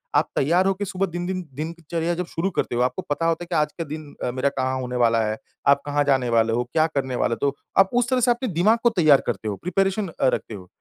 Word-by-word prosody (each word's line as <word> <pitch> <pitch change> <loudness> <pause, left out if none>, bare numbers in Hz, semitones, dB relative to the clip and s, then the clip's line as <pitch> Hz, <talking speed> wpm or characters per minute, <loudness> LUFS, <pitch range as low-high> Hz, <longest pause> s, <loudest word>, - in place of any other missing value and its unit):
आप - - +3
तैयार 170 +7 +3
हो 195 - +3
के 200 +2 -4
सुबह 195 0 -1
दिन 175 -1 -5
दिन 185 0 -2
दिनचर्या 165 +2 -3
जब 180 +1 -3
शुरू 170 +3 -2
करते 125 - -1
हो, 120 - +1
आपको 125 0 0
पता 150 +3 -1
होता 165 +1 0
है - - -10
कि 175 - -3
आज 150 -1 +2
के 165 - -3
दिन 150 -1 -8
अ, 125 - 0
मेरा 130 +2 0
कहाँ 130 -1 -2
होने 125 0 -4
वाला 115 -2 +3
है, 110 0 -2 0.3
आप 140 - +5
कहाँ 145 0 +1
जाने 135 -3 +2
वाले 115 -1 +2
हो, 120 +2 +1
क्या 160 0 +3
करने 135 -5 -2
वाले 115 - +1
तो, 140 -1 +1 0.2
आप 195 0 +6
उस 245 0 +2
तरह 255 -1 +2
से 245 +1 +4
आपके 240 +2 -1
दिमाग 205 +8 +4
को 240 - +6
तैयार 155 - +4
करते 110 -2 -2
हो, 105 - -2
प्रिपरेशन 195 - 0
अ, 165 - -1
रखते - - -3
हो। 95 -3 -9
155 Hz, 270 wpm, -23 LUFS, 130-180 Hz, 0.3 s, आप